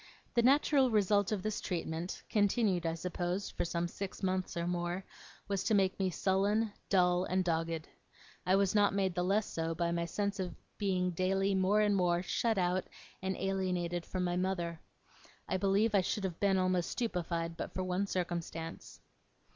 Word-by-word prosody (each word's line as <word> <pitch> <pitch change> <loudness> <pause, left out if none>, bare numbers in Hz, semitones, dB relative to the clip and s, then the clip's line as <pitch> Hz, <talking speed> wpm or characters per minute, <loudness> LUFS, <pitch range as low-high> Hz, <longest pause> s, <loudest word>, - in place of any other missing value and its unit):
The 235 - +4
natural 270 +1 +4
result 205 -2 +3
of 200 -3 -1
this 215 -1 -2
treatment, 170 -1 -3
continued, 205 -4 +2
I 165 - -1
suppose, 180 +2 -3
for - - -2
some 170 0 -1
six 195 +3 -6
months 185 -1 -1
or 170 - -1
more, 175 +1 -2 0.4
was 195 -1 -1
to 220 - +3
make 190 -1 +2
me 190 -1 +2
sullen, 200 +4 +1 0.2
dull, 180 -1 +3
and 185 0 +1
dogged. 165 -1 -1 0.6
I 185 - +3
was 195 -1 +2
not 205 -2 +3
made 190 -2 +1
the 180 - -1
less 200 +3 +2
so 165 0 -3
by 170 0 0
my 170 0 0
sense 200 +4 -2
of 180 -2 -3 0.2
being 185 -3 +1
daily 195 +3 +1
more 190 +2 +3
and 205 -1 +3
more 175 -2 +2
shut 225 +3 0
out 180 0 +1 0.4
and 190 0 -2
alienated 180 -3 -1
from 185 +1 -3
my 175 -1 0
mother. 175 -3 -2 0.7
I 185 - 0
believe 200 +3 +2
I 200 - +5
should 195 +2 -2
have 180 -3 -3
been 195 -1 +3
almost 185 -2 +1
stupefied 170 -7 -2
but - - -5
for 185 - -1
one 185 +2 -1
circumstance. 170 -3 -4
185 Hz, 180 wpm, -33 LUFS, 175-200 Hz, 0.7 s, I